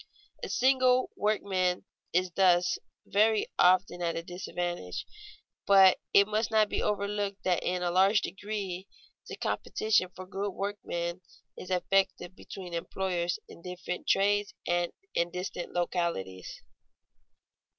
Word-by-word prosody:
A - - -5
single 255 0 +3
workman 190 -4 0 0.3
is 180 +1 +1
thus 180 -1 +3 0.3
very 215 +1 +3
often 180 0 +4
at 170 -1 -1
a 165 - -3
disadvantage, 175 - -4 0.6
but 195 -2 +7
it 200 0 +6
must 215 +1 0
not 215 -1 +3
be - - -1
overlooked 205 -1 -2
that 180 -2 +1
in 180 0 -1
a 175 - 0
large 195 +4 +5
degree 200 -3 -5 0.4
the - - -6
competition 210 -4 0
for 185 - -8
good 195 +1 -4
workmen 180 -3 -3 0.3
is 185 - -9
effective 185 -1 +1
between 185 -3 -9
employers 175 0 -2
in - - -13
different 180 0 -6
trades 205 +1 +2
and 175 0 0 0.2
in 170 0 +1
distant 180 0 -5
localities. 170 - -3
185 Hz, 125 wpm, -29 LUFS, 175-205 Hz, 0.6 s, but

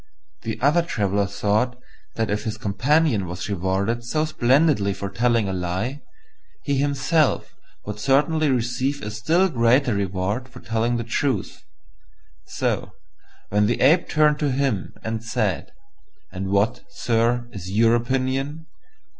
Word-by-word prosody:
The - - -4
other 150 +5 +4
Traveller 100 - 0
thought 110 +5 0 0.4
that 110 -2 -1
if 105 - -1
his 110 0 -3
companion 120 - +1
was 90 0 -5
rewarded 100 +4 -1
so 155 +6 0
splendidly 130 -7 +2
for 100 +1 -5
telling 115 -3 +1
a 95 - -2
lie, 95 +10 -3 0.6
he 140 - 0
himself 145 +2 +1 0.3
would 105 0 -6
certainly 150 +5 +2
receive 130 +3 -1
a 105 - -4
still 160 - +2
greater 125 - +3
reward 100 +5 -2
for - - -12
telling 115 +1 -1
the 115 - -2
truth; 130 +4 -2 0.8
so, - - -2 0.6
when 105 0 +2
the 120 - 0
Ape 160 +6 +4
turned 150 -1 +3
to 145 - +1
him 130 -7 -1
and 110 0 -3
said, - - -1 0.6
"And 95 - -4
what, 100 +3 +1
sir, 120 -4 0
is 95 -4 -7
your 115 +4 +3
opinion?" 135 +5 -1
120 Hz, 140 wpm, -23 LUFS, 105-140 Hz, 0.8 s, other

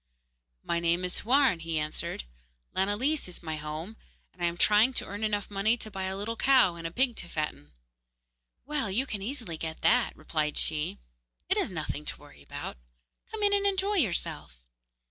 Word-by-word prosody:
'My 170 - 0
name 170 +2 +2
is 180 - -3
Houarn,' 255 -6 +4
he 165 -1 -2
answered, 150 - -2 0.5
'Lanillis 205 +11 +1
is 180 - -9
my 160 -1 -3
home, 155 +8 -5 0.4
and 180 - -17
I - - +2
am 170 0 -2
trying 215 +7 +5
to - - -1
earn 205 +2 -5
enough 205 -1 0
money 210 +4 +2
to 215 -2 -6
buy 190 -1 -3
a 190 +1 -2
little 215 +3 -2
cow 260 -9 +5
and 165 -1 -5
a - - -7
pig 250 +4 +2
to 175 - -6
fatten.' 150 - -3 1.0
'Well, 290 -6 -1
you 230 +8 +2
can 210 -6 -4
easily 220 - -3
get 160 0 -5
that,' 245 +1 +3
replied 150 -2 -1
she; 150 - +1 0.5
'it - - +3
is - - +1
nothing 155 -4 -4
to - - -1
worry 145 - -15
about. 70 - -6 0.5
Come 440 -1 -4
in 405 0 +4
and 400 0 +3
enjoy 395 +1 +1
yourself. 175 - 0
195 Hz, 185 wpm, -29 LUFS, 165-245 Hz, 1.0 s, trying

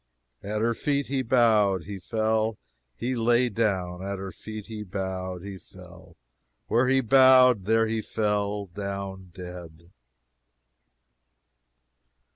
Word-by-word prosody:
"At 105 +1 -3
her 115 +1 +2
feet 140 +3 -1
he 135 0 -1
bowed, 110 -7 +3
he 100 -1 -7
fell, 110 +2 0 0.4
he 125 - -2
lay 120 +1 +2
down: 95 -5 -1
at 100 0 -4
her 95 0 -6
feet 110 0 -9
he 110 -2 -7
bowed, 95 -2 -5
he 100 -1 -8
fell: - - -16 0.5
where 120 +3 +2
he 135 +1 +3
bowed, 130 -3 +6
there 115 +2 +3
he 110 0 -2
fell 105 -2 -1
down 100 0 -6
dead." 85 -2 -10
105 Hz, 120 wpm, -26 LUFS, 95-115 Hz, 0.5 s, bowed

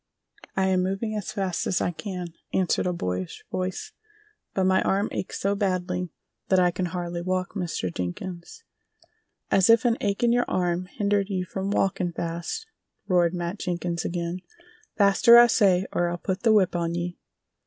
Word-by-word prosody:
"I 190 - +2
am 185 -1 +2
moving 195 +4 -2
as 210 - -4
fast 190 -3 -2
as 185 - +1
I - - 0
can," 180 -2 -6 0.2
answered 185 -1 +1
a - - +1
boyish 90 - -4
voice, 185 - -3 0.6
"but 190 - +2
my 190 0 +3
arm 200 +2 +1
aches - - -4
so 200 +1 +1
badly 180 -3 -1 0.4
that 190 - +3
I 180 -1 +4
can 180 +1 -2
hardly 175 -1 -4
walk, 185 +1 -2
Mr. 170 - -3
Jenkins." 170 - -6 0.9
"As 190 0 +4
if 230 +2 +6
an 235 -1 +3
ache 200 +2 -1
in 235 - +4
your 245 0 +3
arm 180 0 0
hindered 200 +1 0
you 185 -2 -1
from 190 +1 -4
walkin' 185 -3 0
fast!" 170 - -4 0.4
roared 175 -2 +3
Matt 175 +3 -3
Jenkins 175 -1 -2
again. 170 0 -3 0.6
"Faster, 205 +4 +7
I 240 - +10
say, 195 -5 +3
or 175 0 +1
I'll 175 - -3
put 185 +1 -3
the 230 - +4
whip 200 -5 +3
on 170 -1 -1
ye!" 175 0 -4
185 Hz, 175 wpm, -25 LUFS, 175-200 Hz, 0.9 s, I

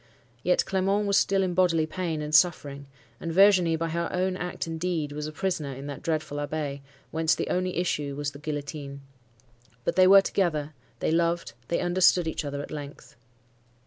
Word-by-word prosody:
Yet 180 +5 +2
Clement 195 +2 +1
was 200 -1 +1
still 195 0 +3
in 180 -1 -1
bodily 175 -3 +3
pain 160 -2 -3
and 150 0 -6
suffering, 145 -4 +2 0.3
and 165 - -4
Virginie, 185 -2 +5
by 165 +1 -2
her 170 +1 -2
own 185 0 0
act 180 -1 -4
and 165 -1 -5
deed, 165 -4 -2
was 150 +1 -4
a - - -6
prisoner 155 -5 -2
in 135 +2 -8
that 140 -2 -6
dreadful 155 -2 -2
Abbaye, 145 -1 -3 0.3
whence 160 0 +2
the - - -3
only 180 -1 -1
issue 150 -5 -1
was 145 0 -3
the 140 - -12
guillotine. 145 -2 -5 0.8
But - - -1
they 185 0 +7
were 195 +1 +9
together: 155 -7 -1 0.3
they - - +1
loved: 170 -1 0
they 170 - 0
understood 180 -1 +3
each 160 - -2
other 145 0 -4
at - - -10
length. 145 -1 -9
165 Hz, 185 wpm, -27 LUFS, 145-180 Hz, 0.8 s, were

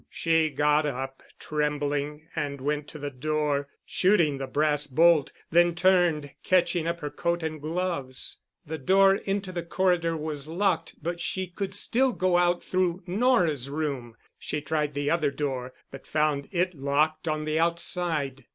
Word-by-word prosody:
She 160 -1 +2
got 150 +1 +2
up, 135 -1 -5 0.2
trembling, 150 0 -2
and 145 -3 -3
went 145 +2 -2
to - - -9
the 145 -1 -5
door, 145 +1 -1 0.2
shooting 170 -8 +2
the 135 - -4
brass 150 +1 +1
bolt, 155 +1 +4 0.2
then 175 0 +4
turned, 175 -5 +3
catching 175 -2 +2
up 170 0 -2
her 150 -1 -4
coat 170 0 -1
and 155 -2 -4
gloves. 155 -5 -3 0.3
The 160 0 -5
door 195 +7 +5
into 195 -1 -2
the 175 -1 -3
corridor 170 -1 +1
was 150 -2 -3
locked 180 +2 0
but 170 +1 -3
she 190 +2 -2
could 190 +2 -5
still 250 +5 +2
go 185 -3 +2
out 175 0 +2
through 185 0 0
Nora's 180 - +2
room. 140 -6 -3 0.2
She 150 - -3
tried 150 0 -2
the 145 0 0
other 160 -4 +2
door, 130 -3 -3 0.2
but 135 - -11
found 150 -2 0
it 180 0 0
locked 150 +3 0
on 155 -1 -1
the 155 +1 0
outside. 165 -5 0
155 Hz, 160 wpm, -27 LUFS, 145-175 Hz, 0.3 s, door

